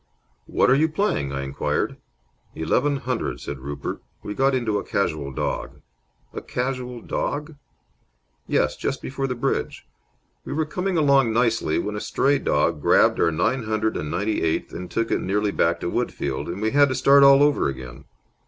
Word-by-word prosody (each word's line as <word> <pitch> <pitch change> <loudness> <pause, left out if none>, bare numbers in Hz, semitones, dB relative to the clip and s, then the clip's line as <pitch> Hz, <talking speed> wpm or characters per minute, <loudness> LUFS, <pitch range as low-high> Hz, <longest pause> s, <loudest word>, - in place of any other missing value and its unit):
"What - - +3
are - - +6
you 155 +3 +3
playing?" 155 - -1
I 70 0 -3
inquired. 70 0 -2 0.6
"Eleven 135 - +1
hundred," 125 -3 -3
said 70 - -6
Rupert. 70 +2 -5 0.2
"We 105 - -4
got 135 +3 +2
into 110 -5 0
a - - -5
casual 75 -8 -2
dog." - - -4 0.5
"A - - -5
casual 125 -1 -4
dog?" 150 +2 -3 0.9
"Yes, - - +1
just - - -3
before 135 +1 -3
the 125 - -3
bridge. 120 - -2 0.6
We - - -5
were 155 +2 0
coming 180 +4 -2
along 140 -6 +4
nicely, 115 -9 +1
when 105 0 -2
a 105 - -4
stray 140 +1 +1
dog - - +1
grabbed - - +4
our 85 - +4
nine 110 +10 0
hundred 110 0 0
and 75 - -3
ninety 100 +6 -1
eighth 80 -1 -1
and 90 - -6
took 115 0 -1
it - - +1
nearly 105 +2 0
back 85 -3 +1
to 85 - -2
Woodfield, 70 -2 -2
and 95 +5 -5
we 110 - +1
had 145 0 +5
to 130 - -1
start 140 +2 +5
all 140 0 +7
over 145 - +3
again. 65 -2 -8
115 Hz, 180 wpm, -23 LUFS, 85-140 Hz, 0.9 s, all